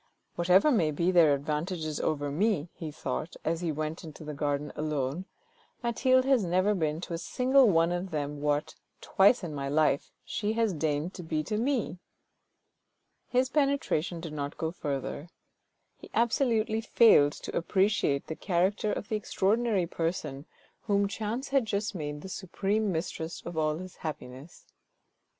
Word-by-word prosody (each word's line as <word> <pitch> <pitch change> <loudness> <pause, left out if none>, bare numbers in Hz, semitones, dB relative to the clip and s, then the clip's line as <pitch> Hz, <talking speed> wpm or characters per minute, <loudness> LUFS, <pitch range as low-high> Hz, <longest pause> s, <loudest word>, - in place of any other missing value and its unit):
Whatever 180 - +4
may 185 - +3
be 170 +4 +1
their 165 -5 +6
advantages 155 +2 -3
over 145 -2 -1
me," 175 0 +1
he 160 - -6
thought, 145 +2 -4
as 165 +1 0
he 170 -2 -1
went 155 +3 -4
into 155 -1 -10
the 150 0 -6
garden 145 0 -2
alone, 150 +2 -2 0.3
" - - -35
Mathilde 255 +2 +3
has 265 -5 +3
never 185 +4 +2
been 155 -5 -1
to 175 - -6
a 165 - -2
single 260 +3 +4
one 165 -2 +3
of 175 +2 -2
them 145 -2 -3
what, 145 0 0 0.3
twice 200 +4 +4
in 165 -3 -4
my 140 -1 -3
life, 150 -1 +2 0.2
she 210 0 -2
has 225 -3 +1
deigned 155 +2 -1
to 180 - -7
be 155 -2 -2
to 210 - -3
me! 235 -5 -1 0.6
" - - -50
His 255 +1 +1
penetration 275 - 0
did 165 -2 -6
not 145 -1 -4
go 160 0 -2
further. 145 0 -4 0.7
He - - -13
absolutely 230 -2 +2
failed 215 -11 +5
to - - -7
appreciate 190 -6 +1
the 160 - -5
character 195 +4 0
of - - -4
the 220 - -1
extraordinary 210 -1 +1
person 165 -4 -3 0.3
whom 200 -1 +1
chance 220 +6 -4
had 270 -4 +2
just 210 +1 -1
made 150 -4 -5
the - - -8
supreme 200 +3 -1
mistress 165 -1 -4
of 170 - -6
all 155 -1 +1
his 185 +1 -9
happiness. 145 -1 -8
170 Hz, 165 wpm, -29 LUFS, 150-210 Hz, 0.7 s, their